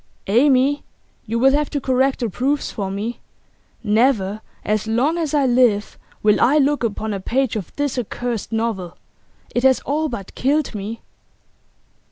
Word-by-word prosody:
'Amy, 265 Hz, +5 st, +3 dB, 0.5 s
you 225 Hz, +2 st, -1 dB
will 265 Hz, +3 st, +5 dB
have 295 Hz, +1 st, +1 dB
to 290 Hz, -, -2 dB
correct 265 Hz, 0 st, +1 dB
the 235 Hz, -, 0 dB
proofs 275 Hz, +8 st, -1 dB
for 195 Hz, -2 st, -3 dB
me. 210 Hz, +5 st, -4 dB, 0.6 s
Never 215 Hz, -2 st, +2 dB, 0.2 s
as 215 Hz, 0 st, 0 dB
long 250 Hz, +9 st, +1 dB
as 310 Hz, -2 st, -1 dB
I 285 Hz, -2 st, +3 dB
live 240 Hz, -5 st, +2 dB, 0.3 s
will 210 Hz, -1 st, +4 dB
I 280 Hz, +5 st, +5 dB
look 290 Hz, -2 st, +2 dB
upon 220 Hz, -1 st, -2 dB
a 200 Hz, -, -3 dB
page 250 Hz, +5 st, 0 dB
of 200 Hz, -6 st, -5 dB
this 285 Hz, -3 st, -1 dB
accursed 240 Hz, -1 st, -4 dB
novel. 220 Hz, -6 st, -2 dB, 0.6 s
It 240 Hz, -, +1 dB
has 260 Hz, 0 st, +4 dB
all 310 Hz, +2 st, -1 dB
but 200 Hz, -7 st, -7 dB
killed 285 Hz, +1 st, 0 dB
me. 215 Hz, +2 st, -5 dB
240 Hz, 160 wpm, -21 LUFS, 215-275 Hz, 0.6 s, will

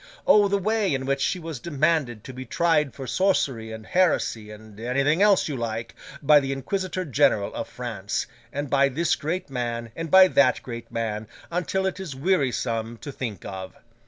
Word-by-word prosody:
O 205 Hz, -1 st, +6 dB
the 200 Hz, 0 st, +1 dB
way 205 Hz, -4 st, +1 dB
in 130 Hz, 0 st, -3 dB
which 135 Hz, 0 st, 0 dB
she 185 Hz, -, +1 dB
was 165 Hz, -6 st, -6 dB
demanded 145 Hz, -6 st, 0 dB
to 130 Hz, -, -9 dB
be 130 Hz, +1 st, -7 dB
tried 150 Hz, +1 st, +1 dB
for 135 Hz, -, -6 dB
sorcery 130 Hz, -, 0 dB
and 110 Hz, -1 st, -8 dB
heresy, 150 Hz, -12 st, +1 dB
and 105 Hz, 0 st, -12 dB
anything 140 Hz, -, +1 dB
else 205 Hz, -2 st, +5 dB
you 145 Hz, -, -3 dB
like, 115 Hz, -2 st, -4 dB, 0.3 s
by 150 Hz, +1 st, +7 dB
the 135 Hz, -1 st, -3 dB
Inquisitor 185 Hz, +7 st, -2 dB
General 130 Hz, -8 st, +2 dB
of -, -, -4 dB
France, 110 Hz, -5 st, -4 dB, 0.3 s
and 145 Hz, +1 st, -3 dB
by 140 Hz, +1 st, +3 dB
this 160 Hz, +6 st, +1 dB
great 165 Hz, +1 st, -4 dB
man, 120 Hz, -2 st, -3 dB
and 165 Hz, 0 st, -4 dB
by 190 Hz, +2 st, +8 dB
that 140 Hz, -7 st, +3 dB
great 115 Hz, -2 st, -8 dB
man, 110 Hz, -2 st, -3 dB, 0.2 s
until 180 Hz, +2 st, -1 dB
it 190 Hz, 0 st, -2 dB
is 175 Hz, -8 st, -6 dB
wearisome 125 Hz, -8 st, 0 dB
to 140 Hz, +6 st, -8 dB
think 115 Hz, -9 st, -6 dB
of! 95 Hz, -1 st, -7 dB
135 Hz, 185 wpm, -25 LUFS, 115-170 Hz, 0.3 s, by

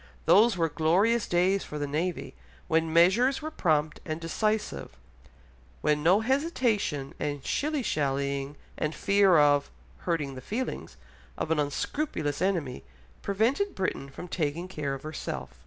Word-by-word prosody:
Those 200 Hz, +5 st, +5 dB
were 165 Hz, -1 st, +2 dB
glorious 185 Hz, +9 st, +2 dB
days 185 Hz, +3 st, +2 dB
for 150 Hz, -, -7 dB
the 145 Hz, -, -2 dB
navy, 160 Hz, +5 st, -3 dB, 0.3 s
when 160 Hz, -1 st, +1 dB
measures 195 Hz, +11 st, +4 dB
were 310 Hz, -, -4 dB
prompt 155 Hz, -, 0 dB
and 155 Hz, -1 st, -4 dB
decisive, 170 Hz, -, -2 dB, 0.8 s
when 150 Hz, 0 st, +2 dB
no 180 Hz, +7 st, +4 dB
hesitation 230 Hz, -, 0 dB
and 145 Hz, -2 st, -3 dB
shilly 300 Hz, -2 st, -1 dB
shallying 140 Hz, -3 st, -1 dB, 0.2 s
and 155 Hz, +1 st, -1 dB
fear 200 Hz, -3 st, +4 dB
of 145 Hz, -1 st, +4 dB, 0.3 s
"hurting 155 Hz, -6 st, -2 dB
the 130 Hz, -, -8 dB
feelings" 240 Hz, -, -4 dB, 0.4 s
of 160 Hz, -, -3 dB
an 160 Hz, -, +2 dB
unscrupulous 145 Hz, -, -2 dB
enemy 170 Hz, -, -1 dB, 0.4 s
prevented 235 Hz, -, 0 dB
Britain 160 Hz, -7 st, -2 dB
from 155 Hz, +6 st, -9 dB
taking 165 Hz, 0 st, -2 dB
care 150 Hz, -6 st, -3 dB
of 135 Hz, -, -10 dB
herself. 155 Hz, 0 st, -6 dB
165 Hz, 140 wpm, -28 LUFS, 145-205 Hz, 0.8 s, Those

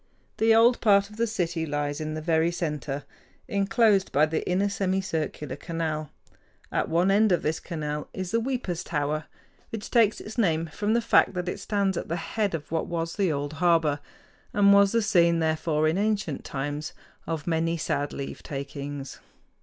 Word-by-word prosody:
The 225 Hz, 0 st, +4 dB
old 235 Hz, +2 st, +5 dB
part 200 Hz, -2 st, +4 dB
of 210 Hz, -, -13 dB
the 235 Hz, +1 st, +1 dB
city 175 Hz, -6 st, -1 dB
lies 145 Hz, -1 st, -2 dB
in 155 Hz, 0 st, -3 dB
the 155 Hz, -, -5 dB
very 165 Hz, 0 st, +2 dB
center, 150 Hz, -5 st, -3 dB, 0.4 s
inclosed 200 Hz, 0 st, +2 dB
by 145 Hz, +3 st, +4 dB
the 155 Hz, +1 st, -2 dB
inner 190 Hz, +3 st, +2 dB
semicircular 185 Hz, -7 st, -2 dB
canal. 160 Hz, -3 st, -3 dB, 0.6 s
At -, -, 0 dB
one 175 Hz, +4 st, +3 dB
end 210 Hz, +1 st, +4 dB
of 175 Hz, -, +2 dB
this 155 Hz, +1 st, 0 dB
canal 150 Hz, -3 st, -4 dB
is 185 Hz, -1 st, -5 dB
the 230 Hz, -, +2 dB
"Weepers' 230 Hz, -8 st, -2 dB
Tower," 150 Hz, -1 st, -2 dB, 0.4 s
which 225 Hz, -3 st, -6 dB
takes 225 Hz, -3 st, +4 dB
its 220 Hz, +3 st, -7 dB
name 165 Hz, -6 st, +2 dB
from 205 Hz, +7 st, 0 dB
the 235 Hz, -, +3 dB
fact 220 Hz, -, +4 dB
that 180 Hz, 0 st, -3 dB
it -, -, -3 dB
stands 200 Hz, -3 st, 0 dB
at -, -, -4 dB
the 165 Hz, -, -2 dB
head 200 Hz, +2 st, -1 dB
of 155 Hz, -2 st, -7 dB
what 165 Hz, -1 st, -1 dB
was 165 Hz, -1 st, -3 dB
the 195 Hz, -5 st, +1 dB
old 145 Hz, 0 st, -3 dB
harbor, 165 Hz, -4 st, +3 dB, 0.5 s
and 200 Hz, -1 st, +6 dB
was 200 Hz, 0 st, +6 dB
the 230 Hz, -1 st, +2 dB
scene, 170 Hz, -5 st, +4 dB
therefore, 155 Hz, -1 st, +1 dB
in 160 Hz, +5 st, +1 dB
ancient 205 Hz, -8 st, -1 dB
times, 145 Hz, +2 st, -4 dB, 0.3 s
of 160 Hz, -2 st, -3 dB
many 165 Hz, 0 st, 0 dB
sad 145 Hz, -2 st, -1 dB
leavetakings. 140 Hz, 0 st, -6 dB
170 Hz, 175 wpm, -26 LUFS, 155-200 Hz, 0.6 s, and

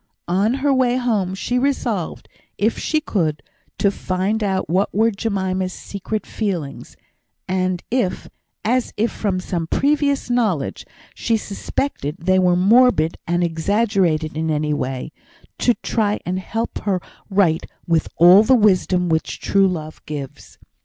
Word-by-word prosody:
On 200 Hz, +7 st, +2 dB
her 275 Hz, +1 st, +1 dB
way 255 Hz, -1 st, +2 dB
home 210 Hz, -7 st, 0 dB
she 245 Hz, +5 st, -1 dB
resolved, 245 Hz, -, -1 dB, 0.3 s
if 220 Hz, +3 st, +1 dB
she 310 Hz, -, +1 dB
could, 160 Hz, -, -1 dB, 0.3 s
to 200 Hz, -, +2 dB
find 195 Hz, +3 st, -1 dB
out 190 Hz, -2 st, 0 dB
what 185 Hz, +5 st, +1 dB
were 225 Hz, +2 st, +3 dB
Jemima's 190 Hz, -3 st, -2 dB
secret 210 Hz, +2 st, -5 dB
feelings; 180 Hz, -10 st, -4 dB, 0.5 s
and 185 Hz, -1 st, -1 dB
if 235 Hz, -7 st, -1 dB, 0.4 s
(as, 250 Hz, +2 st, +1 dB, 0.2 s
from 195 Hz, -4 st, -2 dB
some 170 Hz, -3 st, -3 dB
previous 280 Hz, -, +1 dB
knowledge, 220 Hz, -, -1 dB, 0.3 s
she 230 Hz, -2 st, 0 dB
suspected) 200 Hz, -, -3 dB
they 185 Hz, +2 st, +2 dB
were 180 Hz, -1 st, +3 dB
morbid 195 Hz, -4 st, +4 dB
and 175 Hz, +1 st, +1 dB
exaggerated 170 Hz, -2 st, +1 dB
in 160 Hz, +1 st, -1 dB
any 150 Hz, -1 st, 0 dB
way, 130 Hz, -2 st, -3 dB, 0.5 s
to 245 Hz, -, +3 dB
try 210 Hz, -2 st, 0 dB
and 185 Hz, +1 st, -1 dB
help 225 Hz, +4 st, -3 dB
her 195 Hz, -3 st, 0 dB, 0.3 s
right 185 Hz, -5 st, +2 dB, 0.2 s
with 165 Hz, -2 st, +1 dB
all 180 Hz, +4 st, +8 dB
the 255 Hz, +4 st, +4 dB
wisdom 185 Hz, -4 st, +3 dB
which 160 Hz, -1 st, -1 dB
true 195 Hz, -1 st, +3 dB
love 155 Hz, -4 st, -5 dB
gives. 140 Hz, -3 st, -7 dB
190 Hz, 140 wpm, -20 LUFS, 170-225 Hz, 0.5 s, all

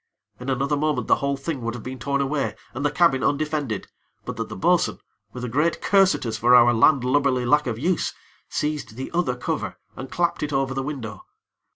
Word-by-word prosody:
In 125 Hz, +2 st, -5 dB
another 135 Hz, +3 st, +1 dB
moment, 150 Hz, +1 st, 0 dB
the -, -, +4 dB
whole 140 Hz, 0 st, -1 dB
thing 140 Hz, -1 st, -4 dB
would 115 Hz, 0 st, -3 dB
have 120 Hz, -, -8 dB
been 130 Hz, 0 st, -6 dB
torn 140 Hz, 0 st, 0 dB
away, 135 Hz, -6 st, -1 dB, 0.2 s
and 130 Hz, +3 st, -4 dB
the 145 Hz, -, +3 dB
cabin 145 Hz, -4 st, +3 dB
undefended, 145 Hz, -7 st, -1 dB, 0.4 s
but -, -, -5 dB
that -, -, -4 dB
the -, -, -6 dB
bo'sun, -, -, +2 dB, 0.3 s
with 125 Hz, -, -7 dB
a -, -, -2 dB
great 150 Hz, +8 st, +1 dB
curse 195 Hz, -1 st, +4 dB
at -, -, -6 dB
us 110 Hz, -1 st, -2 dB
for 120 Hz, +2 st, +5 dB
our 120 Hz, 0 st, +7 dB
landlubberly 130 Hz, +1 st, +3 dB
lack 150 Hz, +3 st, +3 dB
of 115 Hz, -2 st, -2 dB
use, 165 Hz, +6 st, 0 dB, 0.4 s
seized 150 Hz, -7 st, -3 dB
the 130 Hz, +2 st, -6 dB
other 170 Hz, -8 st, 0 dB
cover, 125 Hz, -, -3 dB, 0.2 s
and 130 Hz, +2 st, -7 dB
clapped 170 Hz, +3 st, 0 dB
it 150 Hz, -, -2 dB
over 135 Hz, -1 st, 0 dB
the 135 Hz, -, -2 dB
window. 125 Hz, -8 st, -5 dB
135 Hz, 210 wpm, -24 LUFS, 125-150 Hz, 0.4 s, our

